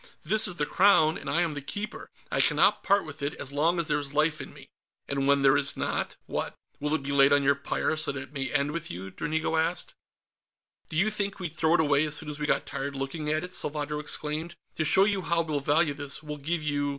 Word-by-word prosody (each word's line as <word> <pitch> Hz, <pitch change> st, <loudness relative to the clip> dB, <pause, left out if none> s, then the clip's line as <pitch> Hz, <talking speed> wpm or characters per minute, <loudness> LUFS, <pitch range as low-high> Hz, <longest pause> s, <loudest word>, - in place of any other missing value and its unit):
"This 215 Hz, +7 st, +4 dB
is 180 Hz, -, -1 dB
the 150 Hz, -, -1 dB
Crown, 160 Hz, -3 st, +4 dB
and -, -, -6 dB
I 170 Hz, -, +2 dB
am 165 Hz, -3 st, -2 dB
the 145 Hz, -, -5 dB
Keeper; 205 Hz, +9 st, -6 dB, 0.2 s
I -, -, +2 dB
cannot -, -, +3 dB
part 200 Hz, -1 st, +2 dB
with 155 Hz, -1 st, -10 dB
it 140 Hz, +1 st, -2 dB
as 130 Hz, -, -5 dB
long 165 Hz, +5 st, +2 dB
as 170 Hz, -, 0 dB
there 150 Hz, -2 st, 0 dB
is 145 Hz, 0 st, -4 dB
life 155 Hz, +1 st, +2 dB
in -, -, -9 dB
me." -, -, -14 dB, 0.4 s
"And 140 Hz, -1 st, -1 dB
when 140 Hz, 0 st, +3 dB
there 135 Hz, -1 st, +6 dB
is -, -, +2 dB
not, -, -, -2 dB
what? -, -, -4 dB, 0.2 s
Will 150 Hz, +2 st, 0 dB
it 155 Hz, -, -3 dB
be 140 Hz, -, -3 dB
laid 140 Hz, 0 st, +5 dB
on 145 Hz, 0 st, +4 dB
your 140 Hz, +1 st, +4 dB
pyre, 140 Hz, +2 st, -2 dB
so 155 Hz, -, -1 dB
that 140 Hz, -, -5 dB
it 135 Hz, -, -10 dB
may 135 Hz, -3 st, -3 dB
end 145 Hz, 0 st, +1 dB
with 165 Hz, +1 st, -5 dB
you?" 95 Hz, +2 st, -7 dB
Dranigo 160 Hz, -, -2 dB
asked. 170 Hz, +2 st, -1 dB, 1.0 s
"Do 155 Hz, -, -4 dB
you 210 Hz, +6 st, +3 dB
think 200 Hz, -2 st, -2 dB
we'd 175 Hz, -5 st, -5 dB
throw 160 Hz, +1 st, +2 dB
it -, -, +2 dB
away 145 Hz, -1 st, +3 dB
as 150 Hz, -, +2 dB
soon 155 Hz, 0 st, -2 dB
as 150 Hz, -, -8 dB
we 150 Hz, -, -2 dB
got -, -, +1 dB
tired 140 Hz, +1 st, -5 dB
looking 135 Hz, +3 st, -4 dB
at 155 Hz, 0 st, 0 dB
it?" 180 Hz, 0 st, -6 dB
Salvadro 150 Hz, -1 st, -3 dB
exclaimed. 155 Hz, +3 st, -4 dB, 0.2 s
"To 155 Hz, -, -1 dB
show 190 Hz, +5 st, +6 dB
you 200 Hz, -2 st, +1 dB
how 170 Hz, -1 st, +1 dB
we'll 155 Hz, -3 st, -2 dB
value 145 Hz, +2 st, +2 dB
this, 145 Hz, +1 st, -5 dB
we'll 150 Hz, -1 st, -6 dB
give 155 Hz, +3 st, -2 dB
you 145 Hz, -1 st, 0 dB
150 Hz, 255 wpm, -27 LUFS, 145-165 Hz, 1.0 s, there